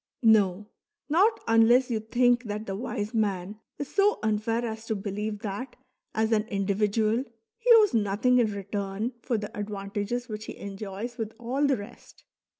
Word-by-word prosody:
No, 205 -3 +4 0.4
not 400 +9 +3
unless 235 +3 +5
you 225 - +1
think 245 +2 +2
that 210 0 -4
the 195 - -4
wise 215 0 -4
man 205 -2 -1 0.2
is 285 - -6
so 410 +1 +3
unfair 220 +2 0
as 220 0 -6
to 220 - 0
believe 210 +1 -4
that 235 +4 -5 0.4
as 220 +1 +1
an 215 -1 +2
individual 210 +3 +1 0.4
he 485 +1 +3
owes 430 -3 +5
nothing 220 +4 +2
in 225 -3 +2
return 200 +2 -3
for 240 -2 -1
the 210 -1 -6
advantages 205 +3 -3
which 215 0 -6
he - - -8
enjoys 200 +4 -6
with 220 -1 -3
all 260 +5 0
the 270 -2 +2
rest. 205 0 -12
220 Hz, 160 wpm, -27 LUFS, 205-240 Hz, 0.4 s, unless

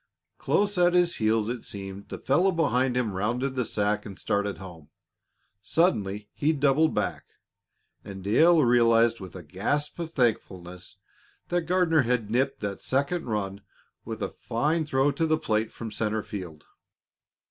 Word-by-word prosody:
Close 205 -2 +1
at 175 0 +4
his 175 -1 +3
heels, 110 -1 +1
it 120 0 -3
seemed, 95 0 -8
the - - -5
fellow 175 +8 +2
behind 130 -7 +1
him 115 -5 0
rounded 120 +8 -1
the 130 -1 0
sack 105 -1 -1
and 100 -3 -9
started 100 0 -1
home. 85 -5 -11 0.7
Suddenly 105 - 0
he 155 +2 +1
doubled 145 +2 +2
back, - - -2 0.8
and 95 -2 -9
Dale 155 - +5
realized 115 -1 +4
with 95 -2 -10
a 90 - -8
gasp 140 - -2
of 165 -1 -4
thankfulness 95 - -2 0.5
that 175 -2 -1
Gardner 175 -3 +3
had 120 -4 -1
nipped 130 +3 0
that 100 -2 -4
second 140 +5 -1
run 100 -3 -3 0.4
with - - -5
a - - -2
fine 155 +7 -1
throw 135 -1 +2
to 160 +4 -1
the 155 0 +2
plate 110 -5 -1
from 115 -2 -7
center 110 0 -1
field. 85 -7 -8
115 Hz, 155 wpm, -26 LUFS, 100-150 Hz, 0.8 s, Dale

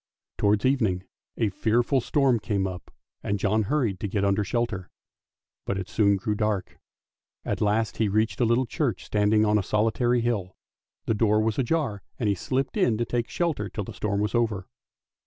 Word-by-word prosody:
Towards 105 +1 +2
evening 110 -9 +1 0.3
a 110 - +1
fearful 120 +6 +1
storm 135 -2 +2
came 100 -2 -1
on 90 -1 -4 0.4
and 100 - -1
John 105 +3 +1
hurried 110 -4 0
to 105 - -2
get 100 0 0
under 100 +1 +2
shelter, 100 -4 -2 0.7
but 100 - -2
it 95 -1 -4
soon 105 -2 +3
grew 105 +3 -1
dark. 105 -2 -2 0.7
At - - -2
last 105 +1 +1
he 110 -2 +1
reached 110 +1 0
a - - +5
little 120 +3 +2
church 120 - -2
standing 105 +1 +3
on 105 0 +3
a - - +1
solitary 115 +4 +1
hill; 105 -6 -2 0.5
the - - +1
door 105 0 +3
was 110 +1 0
ajar, 130 -6 0 0.2
and 115 - -1
he 100 - +3
slipped 130 - -2
in 120 - +3
to 120 - 0
take 120 -1 -2
shelter 155 - -1
till 105 - -4
the - - -8
storm 100 -1 -1
was 105 - -1
over. 110 -6 0
110 Hz, 185 wpm, -26 LUFS, 100-120 Hz, 0.7 s, a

